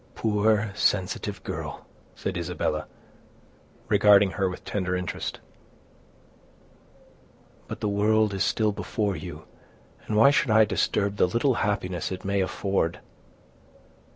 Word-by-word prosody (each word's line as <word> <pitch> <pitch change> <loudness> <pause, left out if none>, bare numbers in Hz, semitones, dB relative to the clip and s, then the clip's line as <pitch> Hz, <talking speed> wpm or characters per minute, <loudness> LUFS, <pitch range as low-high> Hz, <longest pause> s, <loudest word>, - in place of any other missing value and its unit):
"Poor, 105 -1 +1
sensitive 100 -2 -1
girl!" - - -6 0.3
said 95 - -4
Isabella, 90 0 -2 1.0
regarding 100 -1 +5
her 95 -1 0
with 90 - -9
tender 90 -3 -2
interest; 90 -1 -4 2.3
"but - - -7
the - - 0
world 105 +1 +2
is 95 - 0
still 110 -2 +1
before 100 0 -2
you, 80 - -8 0.6
and 105 - 0
why 140 +6 +7
should 145 - +1
I 110 0 +6
disturb 100 0 0
the - - +4
little 120 +8 +1
happiness 95 -5 -2
it 95 0 -6
may 100 0 +1
afford! 95 -2 -1
100 Hz, 120 wpm, -26 LUFS, 95-105 Hz, 2.3 s, why